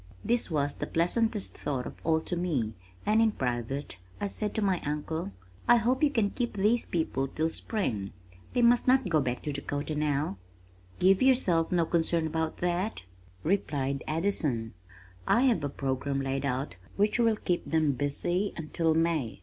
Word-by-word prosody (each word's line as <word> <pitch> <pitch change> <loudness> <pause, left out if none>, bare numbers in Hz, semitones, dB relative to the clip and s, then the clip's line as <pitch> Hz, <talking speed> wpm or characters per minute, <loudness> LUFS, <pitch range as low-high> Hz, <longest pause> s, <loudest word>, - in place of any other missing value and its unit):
This 240 -3 +1
was 145 -3 0
the - - -5
pleasantest 210 +5 +1
thought 130 -4 -3
of - - -6
all 160 -1 +2
to 175 - -3
me 150 -11 -1 0.3
and 215 +2 +4
in 220 -2 +3
private 125 - -3 0.2
I - - -1
said 210 +1 -3
to 220 - 0
my 190 -3 +1
uncle, 150 -1 -3 0.4
"I 240 - +8
hope 245 +3 +2
you 300 - +5
can 225 -8 +1
keep 240 -4 -3
these 215 +4 +2
people 150 -5 -1
till 160 +4 -1
spring. 110 - -2 0.4
They 245 - +2
must 240 +1 +4
not 255 -3 +4
go 155 -3 +3
back 125 -2 -2
to 150 - -2
Dakota 145 +2 -3
now." 150 -7 0 0.6
"Give 190 +1 +4
yourself 200 -11 +3
no 175 -2 +3
concern 165 0 +1
about 160 0 -2
that!" 180 - -1 0.4
replied 140 -7 0
Addison. 155 - 0 0.5
"I 235 - +4
have 240 - +3
a 145 - -1
program 135 0 -2
laid 135 +1 -2
out 130 - -3 0.2
which 210 +4 +2
will 230 -2 +4
keep 175 -4 -2
them 160 -2 +3
busy 175 +9 -1
until 160 0 0
May. 160 -10 0
165 Hz, 170 wpm, -29 LUFS, 140-205 Hz, 0.6 s, I